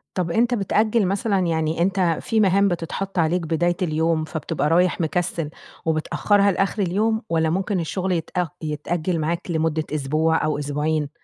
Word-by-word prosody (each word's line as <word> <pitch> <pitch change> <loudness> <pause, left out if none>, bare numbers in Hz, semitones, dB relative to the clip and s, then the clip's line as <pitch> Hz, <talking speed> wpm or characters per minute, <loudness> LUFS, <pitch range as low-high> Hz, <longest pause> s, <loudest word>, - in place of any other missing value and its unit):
طَب، 175 -3 -1
أنت 240 +4 +2
بتأجِّل 215 0 +2
مثلًا، 200 0 0
يعني 160 0 0
أنت 185 -3 +2
في 225 -2 0
مهام 200 0 +4
بتتحَط 180 +2 -3
عليك 170 +2 +2
بداية 170 +2 0
اليوم 160 -1 +1
فبتبقى 155 -2 -2
رايح 175 +1 +2
مكسّل 165 -1 -1 0.4
وبتأخّرها 200 +5 +2
لآخِر 195 +3 0
اليوم؟ 215 +5 +1
والّا 160 -1 +1
ممكن 190 +2 0
الشغل 185 +3 -2
يتأ 175 +1 -1
يتأجِّل 160 +3 -2
معاك 170 +3 -2
لمدة 160 -1 0
أسبوع 155 +3 +1
أو 150 -1 -1
أسبوعين؟ 150 +1 -1
170 Hz, 150 wpm, -22 LUFS, 160-195 Hz, 0.4 s, مهام